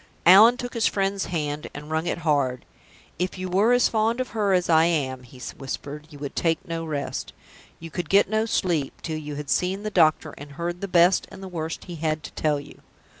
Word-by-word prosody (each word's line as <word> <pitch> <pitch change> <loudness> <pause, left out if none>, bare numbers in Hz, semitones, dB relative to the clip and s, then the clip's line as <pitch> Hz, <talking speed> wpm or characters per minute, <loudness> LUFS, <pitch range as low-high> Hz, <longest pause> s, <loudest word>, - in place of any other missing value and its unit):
Allan 215 +7 +8
took 245 -1 -5
his 230 -1 +2
friend's 195 0 0
hand 150 -3 -3
and 150 +2 -8
wrung 160 +2 -1
it - - -1
hard. 140 -5 +1 0.5
"If 185 +1 -2
you 185 0 -4
were 200 +6 +3
as 245 0 +5
fond 225 +2 0
of 255 - -2
her 210 -3 0
as 180 -2 +2
I 160 -1 +5
am," 135 -6 0
he 125 +1 -15 0.2
whispered, 145 +2 -6
"you 150 - -12
would 140 -1 -6
take 165 -1 0
no 165 -1 -3
rest, 150 -3 -4 0.5
you 165 0 -9
could 175 -2 -4
get 200 +1 +5
no 220 +2 0
sleep, 165 -10 -1
till 160 -2 -3
you 150 -1 -6
had 145 -1 -5
seen 190 +3 0
the 215 - -3
doctor, 155 -3 +3
and 145 0 -10
heard 175 +3 -4
the 200 - -3
best 180 0 +4
and 195 - -11
the - - -6
worst 160 -3 -5
he 175 -2 -8
had 155 -1 -1
to - - -8
tell 150 -2 0
you. 140 - -13
165 Hz, 225 wpm, -24 LUFS, 150-195 Hz, 0.5 s, Allan